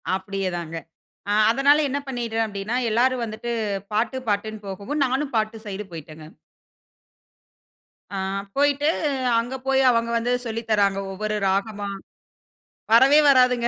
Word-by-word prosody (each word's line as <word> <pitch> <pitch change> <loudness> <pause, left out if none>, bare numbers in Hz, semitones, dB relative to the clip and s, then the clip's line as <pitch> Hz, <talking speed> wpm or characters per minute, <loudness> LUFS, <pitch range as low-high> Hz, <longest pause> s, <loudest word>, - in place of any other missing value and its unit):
அப்டியே 195 0 -3
தாங்க. 165 -1 -6 0.5
அ - - +2 0.2
அதனால 280 +4 +4
என்ன 280 +2 -1
பண்ணிட்டேன் 230 -3 -1
அப்டின்னா, 210 +3 -3
எல்லாரும் 250 +2 +2
வந்துட்டு 225 +2 -5 0.4
பாட்டு 225 +4 0
பாட்டுனூ 215 +1 -1
போகவும். 205 +10 -2
நானும் 270 +2 -2
பாட்டு 220 0 0
சைடு 205 +1 -5
போய்ட்டேங்க. 155 -1 -10 1.9
ஆ - - -3 0.4
போய்ட்டு, 285 +1 +2 0.5
அங்கே 245 +3 -4
போய் 270 0 +3
அவங்க 230 -1 0
வந்து 235 +2 -1
சொல்லி 230 0 -3
தராங்க 200 -2 +3
ஒவ்வொரு 215 +2 -3
ராகமா. 200 +1 -1 1.0
வரவே 265 +6 +7
வராதுங்க 250 -3 +4
225 Hz, 125 wpm, -23 LUFS, 200-255 Hz, 1.9 s, வரவே